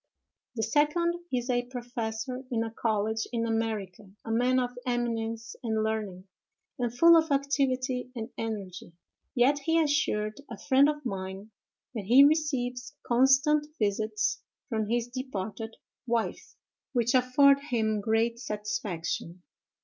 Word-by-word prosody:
The 225 - -1
second 300 +8 +2 0.2
is 245 -1 -1
a 245 -1 0
professor 245 0 -4
in 225 -2 0
a 225 - -5
college 220 0 -1
in 230 -1 -1
America, 215 -4 -3 0.2
a 225 - -4
man 250 +3 +2
of 245 -1 -1
eminence 230 -1 -2
and 220 -3 -1
learning, 210 -4 -3 0.5
and 240 -2 0
full 335 +8 +7
of 320 -1 +3
activity 260 -3 0
and 230 +1 -5
energy—yet 220 +6 -2
he 325 +3 +1
assured 285 -7 0
a 225 - -7
friend 275 +4 +4
of 295 -2 -4
mine 195 0 -5 0.4
that 215 -5 -5
he 250 +7 +7
receives 270 -4 +1
constant 270 +5 +4
visits 215 - 0 0.3
from 220 -3 -1
his 235 +1 0
departed 225 -3 -5 0.3
wife, 230 -1 -2 0.4
which 240 -1 +1
afford 270 +2 +5
him 220 -6 -1
great 225 +2 +1
satisfaction. 205 -6 -4
240 Hz, 125 wpm, -28 LUFS, 220-265 Hz, 0.5 s, full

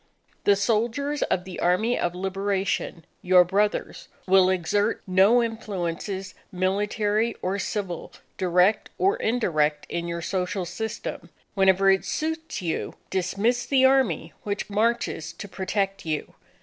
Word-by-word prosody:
The 200 - +6
soldiers 235 +8 0
of 180 - 0
the 185 -1 -8
Army 200 +8 +2
of 175 0 -1
Liberation, 195 -2 -2 0.2
your 180 0 +6
brothers, 200 +4 -1 0.2
will 190 -1 +5
exert 205 +4 0
no 195 +6 +5
influences, 195 -3 -4 0.2
military 205 +4 0
or 190 +2 -1
civil, 195 -3 -4 0.2
direct 180 +3 +2
or 395 +5 +2
indirect, 155 - 0
in 170 0 -3
your 170 0 -4
social 185 +1 -2
system. 215 +6 -5 0.2
Whenever 195 0 +4
it 190 - +2
suits 320 - -3
you, 165 - -3 0.2
dismiss 200 +6 0
the 265 -2 +4
Army 265 -2 +2
which 205 0 -4
marches 215 -7 0
to 185 +4 -8
protect 195 +1 -2
you. 155 -2 -3
195 Hz, 125 wpm, -25 LUFS, 180-220 Hz, 0.2 s, The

